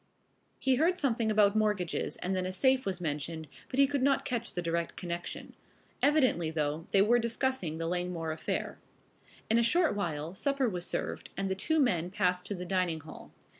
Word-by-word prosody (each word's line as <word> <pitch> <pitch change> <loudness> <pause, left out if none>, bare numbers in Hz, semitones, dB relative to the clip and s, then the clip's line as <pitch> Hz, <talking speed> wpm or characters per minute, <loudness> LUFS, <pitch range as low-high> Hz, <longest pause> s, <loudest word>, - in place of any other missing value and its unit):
He 265 -2 +2
heard 345 +5 +3
something 235 -8 +1
about 210 -1 +4
mortgages 210 -5 0
and 190 +1 -2
then 185 0 -1
a - - -2
safe 260 +5 +2
was 185 -2 -2
mentioned, 160 0 -3 0.2
but 255 - -4
he 275 - +7
could 280 -1 -1
not 275 0 +2
catch 235 -2 -2
the 175 - -3
direct 170 0 -1
connection. 175 -1 -5 0.5
Evidently 260 - +3
though, 155 0 -2
they 195 -1 +5
were 240 +3 +4
discussing 235 - -1
the 165 - -3
Langmore 175 -1 -2
affair. 155 - -3 0.7
In 225 +1 +3
a - - +4
short 320 +8 +3
while 165 -4 -3
supper 275 +6 +1
was 180 -5 -3
served - - -3
and 195 0 -1
the - - +3
two 315 +11 0
men 180 - +2
passed 180 -2 0
to 205 - -3
the 180 0 -6
dining 180 -4 0
hall. 155 +1 -12
190 Hz, 190 wpm, -30 LUFS, 170-245 Hz, 0.7 s, he